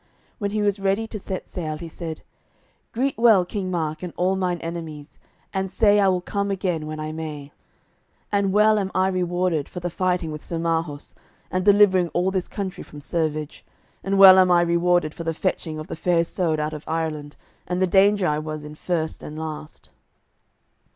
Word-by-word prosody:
When 205 -2 -1
he 210 +1 -1
was 205 -1 +1
ready 195 +3 0
to 220 -1 -6
set 190 -1 -5
sail 155 -4 -4
he 170 - -7
said: 160 -1 -7 0.7
"Greet 265 +1 -1
well 220 -6 +6
King 190 0 -4
Mark 160 -3 -2
and 180 -2 -5
all 185 +2 +2
mine 180 -2 -1
enemies, 165 -3 -7 0.3
and 190 0 -1
say 205 -1 +4
I 200 - +4
will 185 -1 +2
come 200 +2 -2
again 180 -5 -2
when 155 0 -5
I 155 0 -4
may. 150 -3 -6 0.8
And 200 -1 +1
well 210 +1 +4
am 195 -2 -2
I 185 0 +3
rewarded 180 -4 -1
for 180 - -6
the 175 0 -4
fighting 180 -2 -1
with 150 0 -7
Sir 170 - -4
Marhaus, 165 -3 -2 0.4
and 185 0 0
delivering 200 -3 +5
all 180 +2 +2
this 185 -2 -1
country 195 -2 -5
from 150 - -13
servage, 155 0 -3 0.4
and 195 0 0
well 190 -1 +10
am 185 -1 +5
I 175 -1 +5
rewarded 170 -2 +2
for 170 - -7
the 165 -1 -2
fetching 165 -3 -2
of 155 - -6
the - - -6
Fair 170 +1 +2
Isoud 165 -2 -1
out 150 +1 -2
of 150 0 -7
Ireland, 155 -2 -3 0.3
and 180 0 -1
the 185 - +4
danger 195 +1 +4
I 150 -2 +1
was 155 -1 -6
in 150 - -8
first 160 0 -3
and 150 - -8
last." 155 -1 -7
175 Hz, 195 wpm, -23 LUFS, 155-190 Hz, 0.8 s, well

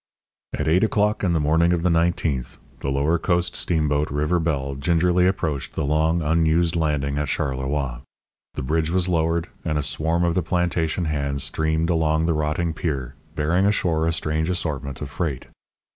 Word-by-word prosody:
At - - -2
eight 85 +5 +3
o'clock 105 -1 +1
in 90 -3 +2
the 80 - +2
morning 80 +3 +3
of 85 -1 -1
the 90 - +3
nineteenth, 80 -6 0 0.2
the - - -3
lower 70 +5 +1
coast 90 0 0
steamboat 75 -4 +1
River 75 +5 0
Belle 70 -4 -1
gingerly 85 +5 +2
approached 80 -8 -2
the 80 - -2
long 80 +3 +1
unused 80 +2 +2
landing 75 -3 0
at 75 - -1
Charleroi. 65 -2 -2 0.5
The - - -3
bridge 80 +4 0
was 90 +1 +1
lowered, 85 0 0 0.2
and 80 -2 -1
a 75 - 0
swarm 80 +3 0
of 85 -1 +2
the 90 - +1
plantation 85 0 0
hands 70 -3 -1
streamed 80 +2 0
along 80 -1 +1
the 85 - +2
rotting 75 +2 -1
pier, 70 -6 -3 0.2
bearing 85 +5 +2
ashore 85 -6 +1
a - - +2
strange 80 0 0
assortment 70 -6 -3
of 70 -2 -5
freight. 70 -4 -3
80 Hz, 175 wpm, -23 LUFS, 75-85 Hz, 0.5 s, eight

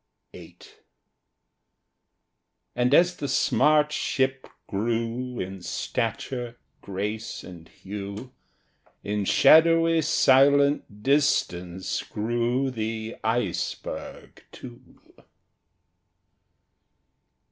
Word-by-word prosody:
VIII - - -13 2.2
And 125 +1 +1
as 175 +4 +4
the 140 - -4
smart 150 +2 +2
ship 130 -3 -1 0.2
grew 115 +4 -3
In 95 0 -6
stature, 120 +6 -4 0.2
grace, 105 +3 -5
and 85 -3 -12
hue, 100 +5 -8 0.7
In 105 0 -2
shadowy 165 - +5
silent 140 -6 +3
distance 95 -10 0
grew 120 +4 -1
the 110 -1 -4
Iceberg 110 -5 -4
too. 120 -2 -13
120 Hz, 70 wpm, -25 LUFS, 105-140 Hz, 2.2 s, shadowy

